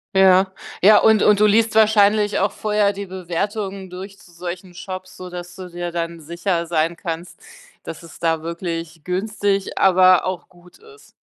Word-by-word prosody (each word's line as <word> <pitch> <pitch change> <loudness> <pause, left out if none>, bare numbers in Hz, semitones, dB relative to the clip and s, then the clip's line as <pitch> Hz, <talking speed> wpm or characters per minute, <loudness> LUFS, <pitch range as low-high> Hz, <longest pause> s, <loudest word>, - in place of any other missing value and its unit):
Ja. 190 0 +5 0.3
Ja, 210 +3 +7
und 220 -2 +4
und 210 -1 +4
du 210 - +5
liest 220 +1 +3
wahrscheinlich 210 -1 +4
auch 200 - +1
vorher 210 -1 0
die 200 0 -6
Bewertungen 190 +2 -4
durch 190 +2 -9
zu 180 - -19
solchen 175 +1 -7
Shops, 185 +1 -8
sodass 180 -1 -8
du 185 -1 -8
dir 175 0 -5
dann 170 -1 -4
sicher 170 +2 -2
sein 165 0 0
kannst, 170 +1 -6 0.4
dass 165 - -8
es 165 - -13
da 165 -1 0
wirklich 165 -1 -5
günstig, 200 +2 -2
aber 185 -1 +5
auch 185 -2 -4
gut 180 -1 -20
ist. 435 0 -18
185 Hz, 165 wpm, -20 LUFS, 170-200 Hz, 0.4 s, Ja